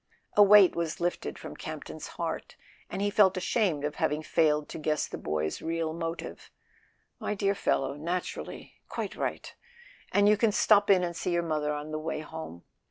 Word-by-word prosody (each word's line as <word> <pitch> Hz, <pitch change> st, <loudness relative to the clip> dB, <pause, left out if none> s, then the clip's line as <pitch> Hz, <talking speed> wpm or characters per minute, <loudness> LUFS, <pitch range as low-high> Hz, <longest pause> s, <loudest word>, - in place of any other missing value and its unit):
" -, -, -45 dB
A 210 Hz, -, +7 dB
weight 205 Hz, -2 st, +8 dB
was 170 Hz, -1 st, -2 dB
lifted 175 Hz, 0 st, -2 dB
from -, -, -8 dB
Campton's -, -, -7 dB
heart, -, -, -4 dB, 0.3 s
and 195 Hz, -, -3 dB
he 205 Hz, -, +1 dB
felt 195 Hz, -3 st, +4 dB
ashamed 180 Hz, -6 st, 0 dB
of 150 Hz, 0 st, -4 dB
having 150 Hz, +1 st, 0 dB
failed 150 Hz, -2 st, +2 dB
to -, -, -6 dB
guess 155 Hz, 0 st, 0 dB
the -, -, -7 dB
boy's 75 Hz, 0 st, -2 dB
real 165 Hz, -1 st, -2 dB
motive. 165 Hz, 0 st, -5 dB, 0.7 s
"My 210 Hz, -, -2 dB
dear 200 Hz, 0 st, +1 dB
fellow, 140 Hz, -8 st, 0 dB
naturally... 170 Hz, +5 st, -5 dB
quite -, -, -4 dB
right. -, -, -4 dB, 0.6 s
And 205 Hz, 0 st, +4 dB
you 210 Hz, 0 st, +5 dB
can 220 Hz, +1 st, +3 dB
stop 205 Hz, -2 st, +4 dB
in 190 Hz, -2 st, +5 dB
and 170 Hz, -1 st, -2 dB
see 180 Hz, -, -2 dB
your 170 Hz, 0 st, +1 dB
mother 155 Hz, -2 st, -1 dB
on 150 Hz, +1 st, -4 dB
the 155 Hz, -, -2 dB
way 155 Hz, 0 st, -3 dB
home. 155 Hz, -, -8 dB
165 Hz, 185 wpm, -29 LUFS, 150-195 Hz, 0.7 s, weight